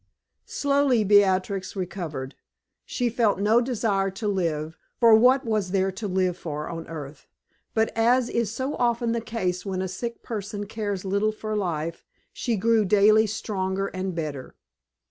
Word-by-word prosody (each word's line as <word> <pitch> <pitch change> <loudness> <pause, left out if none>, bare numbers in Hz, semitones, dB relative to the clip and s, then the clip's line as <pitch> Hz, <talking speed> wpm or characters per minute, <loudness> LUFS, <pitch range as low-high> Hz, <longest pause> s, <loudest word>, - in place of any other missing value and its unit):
Slowly 280 -5 +2
Beatrix 195 -1 +2
recovered. 170 -8 -5 0.5
She 245 - -1
felt 230 -3 +2
no 215 +4 +4
desire 215 -6 0
to 195 +3 -5
live, 165 -5 -1 0.2
for 230 -2 +7
what 255 +4 +5
was 215 -4 0
there 190 0 +1
to 205 +3 -5
live 185 -2 0
for 150 -4 -5
on 165 -1 -6
earth? 150 -3 -8 0.5
But 220 0 +1
as 240 +2 +3
is 235 -3 -1
so 260 +5 -3
often 235 -1 +1
the 230 0 -1
case 185 -6 -2
when 190 -2 -3
a - - -2
sick 235 +6 -6
person 205 -2 -5
cares 205 -2 -4
little 200 +3 +1
for 215 0 -5
life, 170 -4 -3 0.3
she 235 -3 -1
grew 225 +2 +3
daily 210 +2 +5
stronger 195 -2 -2
and 185 -1 -4
better. 150 -5 -5
205 Hz, 155 wpm, -25 LUFS, 185-225 Hz, 0.5 s, for